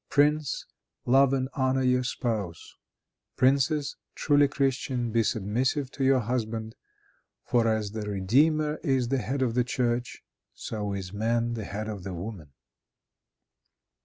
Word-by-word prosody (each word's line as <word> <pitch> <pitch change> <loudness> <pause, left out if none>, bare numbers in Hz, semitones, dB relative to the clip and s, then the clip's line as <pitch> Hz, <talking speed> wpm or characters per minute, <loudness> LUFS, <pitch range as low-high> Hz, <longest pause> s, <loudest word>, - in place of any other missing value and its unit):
Prince, 150 -1 +2 0.4
love 135 +2 +5
and 130 -1 0
honor 130 -3 +1
your 125 0 +3
spouse. 110 -9 -3 0.6
Princess, 140 +3 +2 0.2
truly 145 -1 +4
Christian, 130 -3 -1
be 115 +1 +3
submissive 125 +7 0
to 135 - -3
your 130 -1 +4
husband; 110 -1 -3 0.7
for 120 -2 +2
as 110 -2 0
the 110 0 -4
Redeemer 150 +11 +2
is 130 -6 +1
the 135 0 +1
head 130 +2 -1
of 120 -3 0
the 125 +1 +2
church, 120 0 -2 0.3
so 105 -2 -4
is 95 -1 -5
man 115 +2 0
the 110 -3 -4
head 105 +3 -5
of 105 -4 -6
the 95 -1 -5
woman." 90 -4 -7
120 Hz, 135 wpm, -27 LUFS, 110-135 Hz, 0.7 s, love